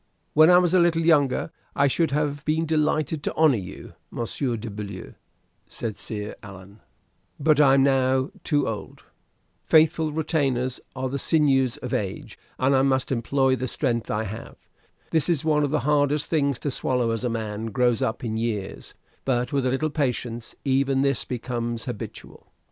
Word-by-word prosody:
"When 155 +2 +7
I 180 - +8
was 180 -1 +3
a 185 - +5
little 170 -1 +3
younger, 150 -2 +2 0.2
I 140 - +3
should 160 +4 +2
have 145 0 -1
been 155 +2 0
delighted 155 -1 0
to - - -3
honor 155 -4 +4
you, 95 -3 -9 0.2
Monsieur 120 +1 -3
de 115 +2 -7
Beaulieu," 100 -2 -7 0.5
said 110 -3 -5
Sire 105 -1 -5
Alain; 100 +1 -12 0.6
"but 150 0 +4
I 135 -2 +6
am 135 - +4
now 130 -1 +2
too 145 -3 +1
old. 110 -2 -6 0.6
Faithful 160 0 +3
retainers 135 -5 -1 0.2
are 130 0 -2
the 140 +2 -3
sinews 135 -6 +2
of 125 - -6
age, 100 -6 -4 0.2
and 135 +2 +2
I 130 - +4
must 135 -1 +1
employ 130 +2 +1
the 130 +1 -3
strength 120 -4 -1
I 105 +1 -1
have. 110 +2 -7 0.6
This 160 +1 +2
is 160 -4 +1
one 150 -2 +3
of 145 - 0
the 150 0 0
hardest 145 +1 +1
things 140 -5 +1
to 145 - -2
swallow 125 -3 0
as 115 +1 -2
a 125 - 0
man 110 -1 -4
grows 120 +1 +1
up 110 - -2
in 110 -2 -2
years; 110 -4 -4 0.3
but 125 -1 -1
with 135 -2 +1
a - - +2
little 145 +4 -1
patience, 120 -5 -3
even 135 0 +2
this 140 -2 +1
becomes 120 -2 -4
habitual. 120 -5 -8
135 Hz, 175 wpm, -24 LUFS, 115-150 Hz, 0.6 s, I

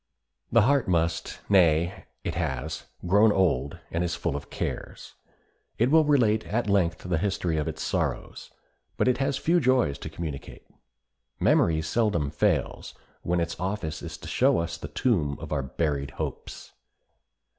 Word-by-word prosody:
The 115 -2 +5
heart 140 +2 +3
must, 85 -2 -1
nay, 85 -1 +3 0.2
it 85 - -2
has, 80 -2 -3 0.2
grown 105 +4 +5
old, 75 -9 +1
and 85 +1 0
is 85 -2 -1
full - - -2
of 70 0 -6
cares. - - -5 0.6
It 120 +4 +2
will 160 0 +6
relate 115 -7 +3
at 115 +1 -1
length 90 -4 +1
the 85 -3 +1
history 90 -4 -1
of 75 - -1
its - - -4
sorrows, - - -3 0.5
but - - +2
it 125 - +2
has 135 0 0
few 170 +5 +2
joys 125 - +2
to - - -6
communicate. 80 -3 -7 0.7
Memory 80 -2 +3
seldom 85 -5 0
fails - - -1 0.3
When 90 +1 0
its 85 -1 -3
office 90 -4 -3
is 80 -1 -7
to - - -10
show 135 +2 +3
us 85 0 -2
the 80 - -7
tomb 75 - 0
of 80 -1 -8
our 75 -3 0
buried 70 0 -2
hopes. - - -6
85 Hz, 155 wpm, -27 LUFS, 80-110 Hz, 0.7 s, will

